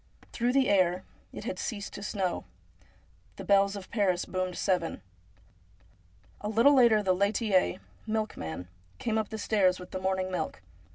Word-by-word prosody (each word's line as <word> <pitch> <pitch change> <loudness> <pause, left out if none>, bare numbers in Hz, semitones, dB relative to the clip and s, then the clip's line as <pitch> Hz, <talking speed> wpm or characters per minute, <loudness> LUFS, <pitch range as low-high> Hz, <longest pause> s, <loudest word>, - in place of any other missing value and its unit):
Through 240 +1 +1
the 270 -1 +4
air 185 -2 +3
— - - -33
it - - -8
had - - -4
ceased 205 -5 -4
to - - -7
snow 195 -3 -2 0.5
— - - -33
the - - -8
bells 200 0 +3
of 195 -2 -9
Paris 195 -5 +1
boomed 185 -1 -3
seven. 180 -4 -1 1.4
A 210 - -4
little 230 +7 +5
later 235 -5 +5
the 185 -2 +3
laitier 200 -1 +1 0.3
(milkman) 150 - -3 0.3
came 220 -1 0
up 215 - -3
the 220 - -5
stairs 190 -4 +2
with 180 - -10
the 185 - -4
morning 190 0 -1
milk. 135 - -3
200 Hz, 165 wpm, -29 LUFS, 185-220 Hz, 1.4 s, little